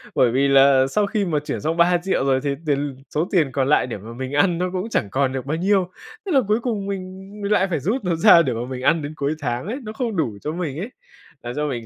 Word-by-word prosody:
bởi 120 Hz, -2 st, +4 dB
vì 135 Hz, +3 st, +2 dB
là 135 Hz, -1 st, +5 dB
sau 205 Hz, +7 st, +1 dB
khi 205 Hz, 0 st, -1 dB
mà 155 Hz, -5 st, 0 dB
chuyển -, -, -3 dB
xong 160 Hz, +3 st, -1 dB
3.000.000 175 Hz, -1 st, +2 dB
rồi 135 Hz, -1 st, +2 dB
thì 140 Hz, -, -1 dB, 0.2 s
tiền 140 Hz, -2 st, +1 dB
l -, -, -5 dB, 0.2 s
số 160 Hz, +4 st, +1 dB
tiền 155 Hz, -8 st, +2 dB
còn 135 Hz, 0 st, 0 dB
lại 145 Hz, -, +3 dB
để 120 Hz, -, -5 dB
mà 110 Hz, +4 st, -10 dB
mình 130 Hz, +2 st, -6 dB
ăn 170 Hz, +3 st, +2 dB
nó 180 Hz, +1 st, -1 dB
cũng 185 Hz, +5 st, -3 dB
chẳng 100 Hz, -, -1 dB
còn 135 Hz, -1 st, 0 dB
được 130 Hz, 0 st, -4 dB
bao 155 Hz, +3 st, -2 dB
nhiêu. 190 Hz, 0 st, +1 dB, 0.4 s
Thế 385 Hz, -, -3 dB
là 270 Hz, -, +4 dB
cuối 215 Hz, +2 st, +2 dB
cùng 220 Hz, -5 st, -2 dB
mình 190 Hz, 0 st, -6 dB
mình 200 Hz, -, -2 dB
lại 195 Hz, -2 st, +3 dB
phải 165 Hz, -5 st, -1 dB
rút 210 Hz, -, -1 dB
nó 175 Hz, -2 st, 0 dB
ra 165 Hz, +1 st, +7 dB
để 160 Hz, -, -1 dB
mà 115 Hz, +2 st, -4 dB
mình 130 Hz, -1 st, -5 dB
ăn 160 Hz, +4 st, +2 dB
đến 145 Hz, +2 st, -6 dB
cuối 145 Hz, +1 st, -1 dB
tháng 125 Hz, +3 st, -3 dB
ấy, 250 Hz, +6 st, -4 dB
nó 215 Hz, 0 st, -7 dB
không 230 Hz, -3 st, -3 dB
đủ 120 Hz, -, -1 dB
cho 150 Hz, -, -3 dB
mình 160 Hz, -4 st, -4 dB
ấy, 215 Hz, +7 st, -5 dB, 0.5 s
làm 120 Hz, 0 st, -5 dB
cho 150 Hz, 0 st, -1 dB
mình 120 Hz, -4 st, -4 dB
160 Hz, 285 wpm, -22 LUFS, 135-190 Hz, 0.5 s, ra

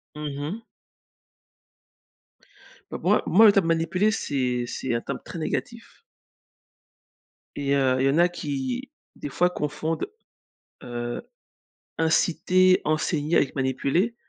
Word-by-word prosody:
Mmh 150 Hz, -2 st, -5 dB
mh. 165 Hz, +11 st, -4 dB, 2.3 s
Bah, -, -, -4 dB
moi -, -, +3 dB
moi 220 Hz, +4 st, +6 dB
le 210 Hz, -, +9 dB
terme 195 Hz, -4 st, +2 dB
manipuler, 170 Hz, +5 st, +1 dB
c'est 125 Hz, -, -1 dB
c'est 120 Hz, -, -3 dB
un 115 Hz, -, 0 dB
terme -, -, -5 dB
très 170 Hz, -, -7 dB
négatif 230 Hz, +8 st, -5 dB, 1.5 s
et 140 Hz, -1 st, -1 dB
heu, 130 Hz, -2 st, +2 dB
il 130 Hz, -, +2 dB
y -, -, +4 dB
en 140 Hz, -, +1 dB
a 175 Hz, +1 st, +5 dB
qui, 175 Hz, -, -4 dB, 0.3 s
des 145 Hz, -, -6 dB
fois, 180 Hz, +6 st, +2 dB
confondent, 155 Hz, -, -3 dB, 0.8 s
heu, 120 Hz, 0 st, -4 dB, 0.8 s
inciter, 180 Hz, +3 st, +3 dB
enseigner 155 Hz, +1 st, 0 dB
avec 135 Hz, -, +2 dB
manipuler. 140 Hz, -, 0 dB
155 Hz, 120 wpm, -25 LUFS, 135-180 Hz, 2.3 s, le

